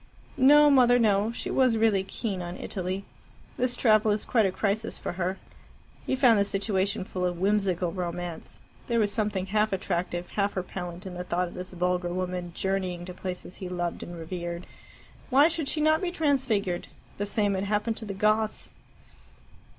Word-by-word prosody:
"No, 295 Hz, +2 st, +7 dB
Mother; 245 Hz, -3 st, +6 dB
no. 210 Hz, -2 st, +3 dB
She 235 Hz, -, -4 dB
was 255 Hz, -4 st, +3 dB
really 215 Hz, -4 st, +3 dB
keen 195 Hz, -1 st, -4 dB
on 175 Hz, 0 st, -6 dB
Italy. 190 Hz, 0 st, -4 dB, 0.5 s
This 245 Hz, 0 st, 0 dB
travel 215 Hz, -2 st, +4 dB
is 205 Hz, 0 st, +1 dB
quite 225 Hz, -5 st, +3 dB
a -, -, -1 dB
crisis 215 Hz, +3 st, -1 dB
for -, -, -4 dB
her." 185 Hz, +2 st, -2 dB, 0.7 s
He -, -, +1 dB
found 250 Hz, -5 st, +5 dB
the -, -, +4 dB
situation 200 Hz, -1 st, 0 dB
full 185 Hz, -2 st, -4 dB
of 175 Hz, -1 st, 0 dB
whimsical 190 Hz, -2 st, +1 dB
romance: 175 Hz, -2 st, -5 dB, 0.2 s
there 235 Hz, -1 st, +1 dB
was 205 Hz, -2 st, +2 dB
something 205 Hz, -3 st, -1 dB
half 210 Hz, +2 st, +1 dB
attractive, 175 Hz, -2 st, -2 dB
half 200 Hz, -1 st, -1 dB
repellent 180 Hz, 0 st, -5 dB
in 185 Hz, -, -6 dB
the 180 Hz, 0 st, -5 dB
thought 180 Hz, 0 st, -1 dB
of -, -, -13 dB
this 185 Hz, +1 st, -7 dB
vulgar 180 Hz, 0 st, 0 dB
woman 180 Hz, -1 st, -3 dB
journeying 185 Hz, -2 st, -2 dB
to 180 Hz, -, -7 dB
places 180 Hz, 0 st, -6 dB
he 185 Hz, -, -6 dB
loved 175 Hz, -1 st, -3 dB
and 175 Hz, 0 st, -7 dB
revered. 170 Hz, +1 st, -5 dB, 0.6 s
Why 280 Hz, +3 st, +6 dB
should 325 Hz, -3 st, -2 dB
she 305 Hz, -, 0 dB
not 310 Hz, +1 st, +3 dB
be 365 Hz, -, 0 dB
transfigured? 260 Hz, -, 0 dB, 0.3 s
The 205 Hz, -, -1 dB
same 205 Hz, -1 st, +1 dB
had 190 Hz, +1 st, -1 dB
happened 210 Hz, +2 st, 0 dB
to 225 Hz, -, -5 dB
the 200 Hz, -2 st, -5 dB
Goths. 215 Hz, +2 st, +1 dB
195 Hz, 180 wpm, -27 LUFS, 180-220 Hz, 0.7 s, No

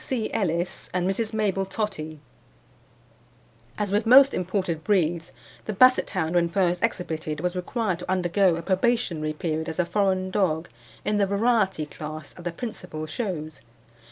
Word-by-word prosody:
C. 235 Hz, -5 st, -2 dB
Ellis 175 Hz, -3 st, -1 dB
and 180 Hz, 0 st, +1 dB
Mrs. 215 Hz, +3 st, -1 dB
Mabel 205 Hz, -3 st, 0 dB
Tottie. 190 Hz, -6 st, -4 dB, 1.6 s
As 205 Hz, -2 st, -2 dB
with 210 Hz, +2 st, +1 dB
most 270 Hz, +3 st, +8 dB
imported 180 Hz, -3 st, -2 dB
breeds, 170 Hz, -4 st, +1 dB, 0.3 s
the 215 Hz, -, -3 dB
Basset 255 Hz, +5 st, +5 dB
hound 170 Hz, -4 st, -1 dB
when 170 Hz, -1 st, +3 dB
first 180 Hz, -1 st, +1 dB
exhibited 160 Hz, -8 st, -2 dB
was 180 Hz, +2 st, -1 dB
required 185 Hz, 0 st, -2 dB
to 180 Hz, -, -8 dB
undergo 185 Hz, 0 st, +2 dB
a 170 Hz, -, -5 dB
probationary 185 Hz, -5 st, 0 dB
period 160 Hz, 0 st, -2 dB
as 160 Hz, -, -5 dB
a 180 Hz, -, +2 dB
foreign 185 Hz, -1 st, 0 dB
dog 170 Hz, -5 st, 0 dB, 0.4 s
in 210 Hz, 0 st, +1 dB
the 200 Hz, -1 st, +2 dB
variety 200 Hz, -5 st, +1 dB
class 155 Hz, 0 st, -8 dB
at 175 Hz, -, -12 dB
the 175 Hz, -, -1 dB
principal 165 Hz, -6 st, -6 dB
shows. 155 Hz, -, -4 dB
185 Hz, 155 wpm, -25 LUFS, 165-210 Hz, 1.6 s, most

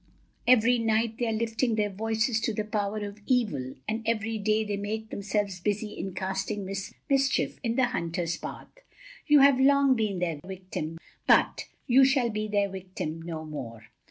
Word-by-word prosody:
Every 245 Hz, 0 st, +5 dB
night 225 Hz, 0 st, +1 dB
they 240 Hz, -, 0 dB
are -, -, 0 dB
lifting 225 Hz, +1 st, 0 dB
their 210 Hz, -1 st, 0 dB
voices 220 Hz, +3 st, 0 dB
to 225 Hz, -, 0 dB
the 215 Hz, -, -1 dB
Power 210 Hz, 0 st, -2 dB
of 205 Hz, +1 st, -8 dB
Evil, 195 Hz, -, 0 dB
and 220 Hz, +1 st, -1 dB
every 225 Hz, -1 st, 0 dB
day 215 Hz, +1 st, +2 dB
they 205 Hz, -1 st, -2 dB
make 215 Hz, +2 st, -4 dB
themselves 200 Hz, -1 st, -2 dB
busy 210 Hz, +3 st, -1 dB
in 190 Hz, -2 st, -6 dB
casting 190 Hz, +2 st, -2 dB, 0.4 s
mischief 275 Hz, -1 st, +1 dB
in 230 Hz, -2 st, -1 dB
the 260 Hz, -1 st, +4 dB
hunter's 170 Hz, -7 st, -2 dB
path. -, -, -8 dB, 0.6 s
You 295 Hz, -2 st, +7 dB
have 275 Hz, -1 st, +6 dB
long 275 Hz, 0 st, +5 dB
been 215 Hz, -4 st, -1 dB
their 170 Hz, -4 st, -2 dB
victim, 185 Hz, -4 st, -6 dB, 0.3 s
but -, -, +4 dB, 0.2 s
you 260 Hz, +2 st, +6 dB
shall 260 Hz, -3 st, +3 dB
be 215 Hz, 0 st, -2 dB
their 205 Hz, -1 st, +1 dB
victim 185 Hz, -4 st, -5 dB
no 165 Hz, -1 st, -5 dB
more. 115 Hz, -7 st, -8 dB
215 Hz, 170 wpm, -28 LUFS, 190-230 Hz, 0.6 s, You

